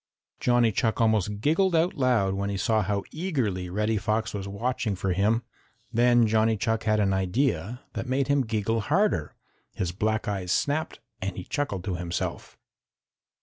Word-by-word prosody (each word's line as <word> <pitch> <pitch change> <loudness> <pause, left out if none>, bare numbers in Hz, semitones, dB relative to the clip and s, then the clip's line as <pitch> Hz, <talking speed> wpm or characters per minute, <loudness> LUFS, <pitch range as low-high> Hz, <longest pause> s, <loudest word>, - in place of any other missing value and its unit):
Johnny 120 -2 +3
Chuck 110 +2 0
almost 105 -2 +1
giggled 170 - +2
out 165 +3 +2
loud 120 -8 +2
as 100 +1 -2
he 100 - -2
saw 110 +1 +2
how 100 0 -1
eagerly 125 - -2
Reddy 105 +4 0
Fox 110 +2 -1
was 100 -2 -4
watching 115 +2 -2
for 95 0 -1
him. 105 +5 +2 0.5
Then 120 0 +5
Johnny 110 0 +2
Chuck 110 +1 -1
had 110 -1 +2
an 100 -2 +2
idea 100 - 0
that 125 - -4
made 130 +1 +1
him 140 -1 +3
giggle 110 +1 0
harder. 160 - +1 0.4
His 90 -2 -1
black 110 +4 -1
eyes 95 -3 -2
snapped 145 +8 0 0.2
and 95 +1 -3
he 90 - -4
chuckled 100 -7 -3
to 95 -3 -2
himself. 85 0 -4
110 Hz, 165 wpm, -26 LUFS, 100-125 Hz, 0.5 s, Then